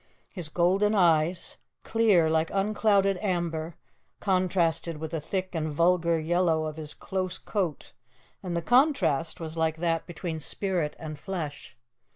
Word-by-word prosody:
His 175 -6 -5
golden 190 +6 +2
eyes, 170 -1 +2 0.3
clear, 215 -8 +3
like 160 0 +1
unclouded 200 -1 +2
amber, 170 -4 -2 0.4
contrasted 175 -4 +1
with 155 0 -6
the 165 -2 -3
thick 185 +4 -3
and 155 -2 -2
vulgar 170 +1 +2
yellow 165 -1 +1
of 155 0 -5
his 150 -2 -6
close 185 -1 -3
coat, 180 - -3 0.5
and 175 -3 -3
the 170 - -2
contrast 225 - +2
was 160 -1 -6
like 160 -1 0
that 165 0 -1
between 170 -2 -5
spirit 175 -1 -1
and 155 -2 -7
flesh. 145 -8 -6
170 Hz, 140 wpm, -27 LUFS, 160-190 Hz, 0.5 s, clear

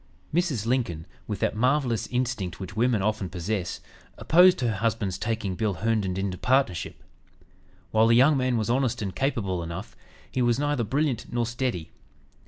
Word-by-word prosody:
Mrs. 155 - 0
Lincoln, 115 -10 -1 0.2
with 105 - -3
that - - +1
marvelous 125 0 +1
instinct 120 -8 -2
which 95 -1 -7
women 115 -3 +2
often 105 -3 -1
possess, 90 0 -3 0.4
opposed 180 -1 +5
her 115 -5 0
husband's 105 -4 -1
taking 105 -1 -2
Bill 105 +1 -1
Herndon 105 -2 0
into 95 -2 -2
partnership. 130 -10 0 0.9
While 110 +1 +4
the 115 - +5
young 135 +5 +6
man 130 -2 +1
was 110 - -1
honest 125 -2 0
and 95 -2 -4
capable 100 -10 -1
enough, 85 0 -7 0.4
he 130 - -1
was 120 -1 +3
neither 145 -3 0
brilliant 135 +2 -1
nor 120 0 0
steady. 120 -7 -3
115 Hz, 160 wpm, -26 LUFS, 95-130 Hz, 0.9 s, young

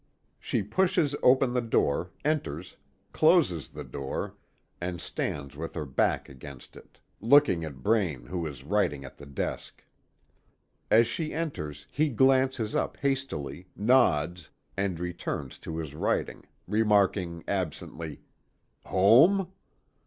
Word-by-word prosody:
She - - -1
pushes 170 - +1
open 130 0 +4
the 125 - +1
door, 90 -7 +1 0.2
enters, 95 - -2 0.4
closes 155 - +3
the - - -8
door, 70 -1 -5 0.5
and 90 0 -3
stands 70 -2 -4
with 80 +3 -6
her 75 -3 -3
back 65 - 0
against 70 0 -12
it, - - -16 0.2
looking 120 - +5
at 70 -5 -8
Braine 90 - +1
who 85 +2 -3
is 70 -3 -9
writing 75 -5 0
at 65 - -12
the 70 - -10
desk. 70 - -5 1.1
As 115 +2 +6
she 155 +4 -4
enters, 75 - -4
he 155 +1 +1
glances 130 -2 +2
up - - -1
hastily, 95 - -3
nods, 90 - +2 0.3
and 95 -3 -1
returns 85 -6 -4
to 80 - -6
his 80 -4 -5
writing, 75 - -2 0.2
remarking 100 -5 +2
absently: 85 -4 -4 0.6
"Home?" 140 - +5
95 Hz, 125 wpm, -28 LUFS, -, 1.1 s, As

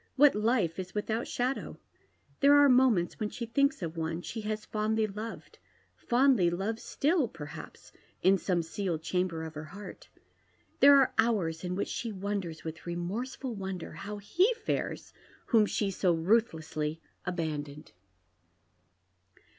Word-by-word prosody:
What 290 +1 +7
life 210 -6 +1
is 185 +1 -6
without 220 +2 -1
shadow? 250 +2 -2 0.6
There 285 +1 +6
are 290 0 +7
moments 250 -9 +3
when 215 -2 -1
she 235 - -5
thinks 280 - +1
of 165 0 -4
one 165 +1 -3
she 225 - -5
has 215 0 -3
fondly 215 +1 0
loved 215 +2 -7 0.2
— - - -39
fondly 245 -7 +4
loves 195 +6 -2
still, 305 -2 +1
perhaps, 150 -7 -10 0.3
in 190 +1 +5
some 175 -3 0
sealed 165 -1 -3
chamber 180 -2 -1
of 160 -1 -7
her 155 0 -7
heart. 200 +6 -10 0.7
There 285 0 +9
are 270 -2 +4
hours 190 -8 +1
in 180 0 -2
which 200 - -1
she 230 - -4
wonders, 195 -4 -4
"vith 160 +1 -8
re 170 - -2
morseful 235 +8 -4
wonder, 190 -4 -5
how 200 +6 -6
he 350 - +2
fares 445 -1 -3 0.3
whom 220 -3 +4
she 200 -1 -1
so 185 -1 +2
ruthlessly 160 -5 0 0.3
abandoned. 150 -4 -4
200 Hz, 145 wpm, -30 LUFS, 170-235 Hz, 0.7 s, There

